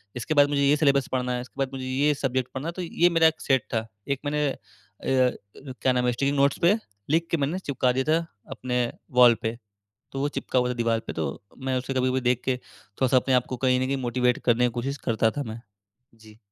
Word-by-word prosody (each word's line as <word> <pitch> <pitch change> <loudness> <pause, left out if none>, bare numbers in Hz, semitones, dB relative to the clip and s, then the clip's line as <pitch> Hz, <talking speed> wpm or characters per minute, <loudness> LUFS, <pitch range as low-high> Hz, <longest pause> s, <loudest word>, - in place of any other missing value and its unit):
इसके 125 +5 -2
बाद 145 -1 +5
मुझे 145 -1 +1
ये 140 +1 +4
सिलेबस 140 -3 +3
पढ़ना 125 -1 0
है, 125 - -2
इसके 130 +2 -13
बाद 135 -1 0
मुझे 130 -1 -5
ये 140 +3 +2
सब्जेक्ट 130 -2 -1
पढ़ना 135 +4 -4
है। - - -1
तो - - -3
ये 175 0 +2
मेरा 165 -1 +5
एक 160 0 -1
सेट 135 -2 +2
था। 110 0 -1 0.2
एक 140 -1 0
मैंने 150 +1 0 0.6
य 130 -1 +2 0.4
क्या 130 - +3
नाम 125 0 +1
है 125 - +3
स्टिकिंग 140 +4 0
नोट्स 140 0 +3
पे 170 +4 +5 0.4
लिख 165 +3 +2
के 170 - +2
मैंने 150 +5 -1
चिपका 130 -7 0
दिया 130 +1 0
था 165 +1 +1 0.3
अपने 125 -1 -3 0.4
वॉल 120 -2 +8
पे। 115 0 -3 0.6
तो 135 - -4
वो 145 - +1
चिपका 140 - -2
हुआ 125 0 +1
था 125 - -2
दीवार 115 -1 0
पे - - -4
तो 80 - -3 0.3
मैं 130 -1 -2
उसे 130 +2 -4
कभी-कभी 130 0 +1
देख 125 -1 +1
के 130 -1 +1
थोड़ा-सा 125 +2 -2
अपने 130 0 +3
को 130 - -4
कहीं 125 0 +2
न 130 - 0
कहीं 135 +1 -1
मोटिवेट 125 0 +1
करने 120 0 +3
की - - 0
कोशिश 130 +4 -3
करता 115 -1 +2
था, 145 - -4
मैं। 110 -1 -7 0.6
जी। 110 -1 -17
130 Hz, 235 wpm, -25 LUFS, 125-140 Hz, 0.6 s, वॉल